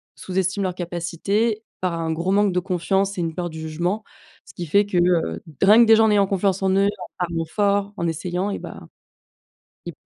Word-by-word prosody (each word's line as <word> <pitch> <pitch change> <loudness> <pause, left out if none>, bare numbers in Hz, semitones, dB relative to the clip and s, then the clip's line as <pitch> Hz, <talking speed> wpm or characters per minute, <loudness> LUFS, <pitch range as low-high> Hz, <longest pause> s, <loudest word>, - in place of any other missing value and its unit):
sous-estiment 190 +1 -2
leurs 185 -2 -2
capacités 185 +6 -2 0.2
par 180 -2 0
un 165 -1 -2
gros 170 +4 -1
manque 205 0 +3
de 180 - +2
confiance 190 +2 -1
et - - -1
une 165 -1 -2
peur 175 -1 -3
du 160 - -8
jugement, 175 +7 -2 0.4
ce - - -15
qui 175 - -5
fait 200 +6 +3
que, 195 -3 -2
heu, 175 - +2
d 155 +3 -2
rien 210 +3 +7
que 235 - +7
des 225 - +8
gens 220 0 +4
ayant 200 -1 +3
confiance 195 0 0
en 190 - +2
eux, 195 +1 +3
en 205 - -5
parlant 170 -2 -2
fort, 200 +3 0
en 170 - -1
essayant, 180 +4 -2
et - - -3
bah, - - -9 1.1
ils - - -5
185 Hz, 215 wpm, -22 LUFS, 170-200 Hz, 1.1 s, des